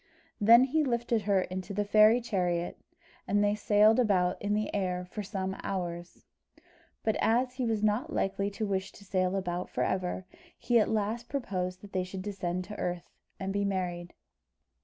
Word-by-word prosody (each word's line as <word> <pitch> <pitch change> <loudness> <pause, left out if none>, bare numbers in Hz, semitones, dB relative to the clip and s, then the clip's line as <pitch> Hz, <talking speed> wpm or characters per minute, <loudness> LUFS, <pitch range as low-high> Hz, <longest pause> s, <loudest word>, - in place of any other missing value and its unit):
Then 230 +3 +7
he 305 +4 +2
lifted 235 -3 0
her 200 -2 +2
into 185 +2 -5
the 205 0 0
fairy 215 +3 +6
chariot, 180 -6 -1 0.5
and 205 +1 +2
they 205 0 +3
sailed 210 +2 +4
about 185 -6 +2
in 205 +1 0
the 215 0 -2
air 180 -2 -1
for 195 +4 -6
some 190 -1 -3
hours. 175 -2 -5 0.8
But 220 - +1
as 245 +3 +2
he 255 -2 -2
was 220 -2 0
not 215 +3 +1
likely 195 +1 0
to 210 +2 -3
wish 190 -2 -2
to 200 - -15
sail 185 -1 0
about 180 -2 -3
for - - -1
ever, 185 0 -2 0.3
he 240 -1 +3
at 215 - +2
last 220 +2 -1
proposed 185 -9 -3
that 205 - -13
they 185 -1 0
should 185 +1 -7
descend 185 -3 -3
to 210 +3 -9
earth, 175 -1 -3 0.3
and 195 0 -3
be 200 0 0
married. 180 -3 -3
200 Hz, 180 wpm, -30 LUFS, 185-215 Hz, 0.8 s, Then